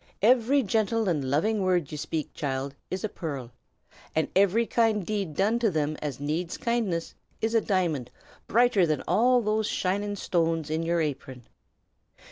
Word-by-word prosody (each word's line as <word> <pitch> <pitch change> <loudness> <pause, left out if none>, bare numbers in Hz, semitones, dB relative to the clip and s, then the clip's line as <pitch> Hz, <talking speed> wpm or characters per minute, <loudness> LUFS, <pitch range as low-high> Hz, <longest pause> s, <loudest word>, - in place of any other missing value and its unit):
Every 255 +4 +4
gentle 220 +1 +1
and 155 -6 +1
loving 205 +10 +1
word 180 -5 +1
ye - - -4
speak, 155 +1 -4
child, 135 -2 -3 0.2
is 185 0 -4
a - - +1
pearl; 140 - -6 0.6
and 160 - +1
every 200 +4 +4
kind 220 -4 +1
deed 200 -7 -3
done 215 +5 +2
to 230 -2 +2
them 155 -3 -1
as 145 -4 -4
needs 160 +4 -2
kindness, 230 -10 -1 0.3
is 225 +1 -1
a 225 - +4
diamond 170 - 0 0.4
brighter 225 -6 +4
than 155 -1 -1
all 240 +8 +4
those 215 0 0
shining 205 +2 -1
stones 165 -5 0
in 160 +1 0
your 170 0 +1
apron. 135 -4 -4
185 Hz, 160 wpm, -27 LUFS, 155-220 Hz, 0.6 s, Every